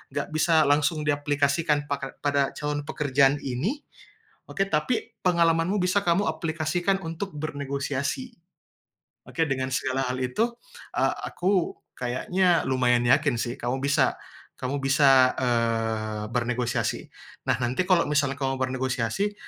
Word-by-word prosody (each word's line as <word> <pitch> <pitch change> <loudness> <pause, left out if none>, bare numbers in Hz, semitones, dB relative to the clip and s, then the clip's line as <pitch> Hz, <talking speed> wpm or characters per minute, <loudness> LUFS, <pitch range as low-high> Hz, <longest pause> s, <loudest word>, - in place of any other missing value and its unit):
nggak 145 - -2
bisa 160 0 +4
langsung 150 +1 +2
diaplikasikan 145 +1 +1
paka 140 -1 -4
pada 140 -1 +1
calon 150 0 -2
pekerjaan 140 -1 +2
ini, 160 - -2 0.7
oke, 195 - 0
tapi 160 +11 -1
pengalamanmu 170 +1 +2
bisa 185 +3 +2
kamu 175 +4 +2
aplikasikan 165 +4 -1
untuk 165 +3 -5
bernegosiasi. 145 - -3 1.0
Oke, 165 - 0
dengan 130 -1 -1
segala 130 -1 -1
hal 125 - -2
itu, 220 - -1 0.4
eee, - - +2 0.2
aku 185 -1 0 0.2
kayaknya 175 +9 +1
lumayan 125 -2 +2
yakin 140 -1 +3
sih 120 +2 -2
kamu 125 +2 -1
bisa 140 0 +2 0.4
kamu 135 +2 -2
bisa, 135 -2 +5
eee, 115 -3 0
bernegosiasi. 125 0 -1 0.4
Nah, - - +4
nanti 125 +9 0
kalau 175 -2 +4
misalnya 140 -2 +2
kamu 135 -1 0
bernegosiasi, 130 - -1
145 Hz, 125 wpm, -26 LUFS, 130-165 Hz, 1.0 s, bisa